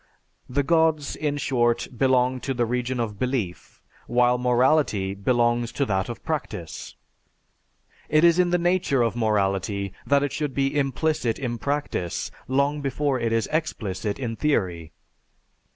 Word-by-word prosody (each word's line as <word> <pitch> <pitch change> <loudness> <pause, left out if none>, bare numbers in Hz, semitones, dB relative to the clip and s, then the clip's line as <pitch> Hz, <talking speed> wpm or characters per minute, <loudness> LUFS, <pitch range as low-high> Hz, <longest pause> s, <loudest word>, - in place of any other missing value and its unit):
The 140 +3 +1
Gods, 160 -1 +2
in 145 -1 -2
short 120 -4 +1
belong 130 0 +2
to 135 +1 -3
the 120 -1 +1
region 125 +1 -2
of 105 -4 -3
belief, 125 -9 -3 0.2
while 125 0 +3
morality 125 -5 +2
belongs 120 +3 +1
to 140 - 0
that 95 -5 -1
of - - -7
practice. - - -5 1.1
It 155 +1 +4
is 170 +1 +5
in 180 -1 +4
the 175 - +3
nature 175 -7 +2
of 115 -1 0
morality 100 -3 0
that 140 0 +3
it 145 - -1
should 150 -4 -3
be 135 +1 0
implicit 140 -3 0
in 120 -4 -3
practice 140 - -2 0.2
long 140 +3 +1
before 140 0 0
it 115 -1 -1
is 115 -2 +1
explicit 105 - -2
in 120 -4 -3
theory. 90 - -1
125 Hz, 145 wpm, -24 LUFS, 115-145 Hz, 1.1 s, is